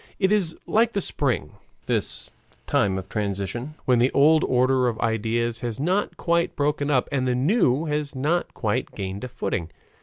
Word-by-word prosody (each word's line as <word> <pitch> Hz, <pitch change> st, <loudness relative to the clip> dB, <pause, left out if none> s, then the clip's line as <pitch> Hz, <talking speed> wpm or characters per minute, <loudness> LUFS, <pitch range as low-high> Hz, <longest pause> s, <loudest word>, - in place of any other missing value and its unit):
It 190 Hz, -1 st, +2 dB
is 185 Hz, -6 st, +2 dB
like 230 Hz, +1 st, +2 dB
the 200 Hz, -, 0 dB
spring, 130 Hz, -, -1 dB, 0.3 s
this -, -, -3 dB, 0.3 s
time 95 Hz, -2 st, +1 dB
of 95 Hz, 0 st, -6 dB
transition, 105 Hz, +7 st, -3 dB
when 125 Hz, -2 st, +3 dB
the 125 Hz, +2 st, +4 dB
old 155 Hz, +3 st, +5 dB
order 130 Hz, 0 st, +2 dB
of 115 Hz, -2 st, -2 dB
ideas 115 Hz, +1 st, 0 dB
has 120 Hz, -1 st, -4 dB
not 185 Hz, +8 st, 0 dB
quite 170 Hz, 0 st, 0 dB
broken 145 Hz, 0 st, 0 dB
up 130 Hz, -4 st, +2 dB
and 130 Hz, -2 st, 0 dB
the 125 Hz, -, +1 dB
new 145 Hz, -, +2 dB
has 150 Hz, -2 st, -2 dB
not 155 Hz, +7 st, 0 dB
quite 105 Hz, -2 st, -2 dB
gained 100 Hz, +1 st, -5 dB
a -, -, -3 dB
footing. 120 Hz, -9 st, -3 dB
130 Hz, 175 wpm, -24 LUFS, 115-155 Hz, 0.3 s, old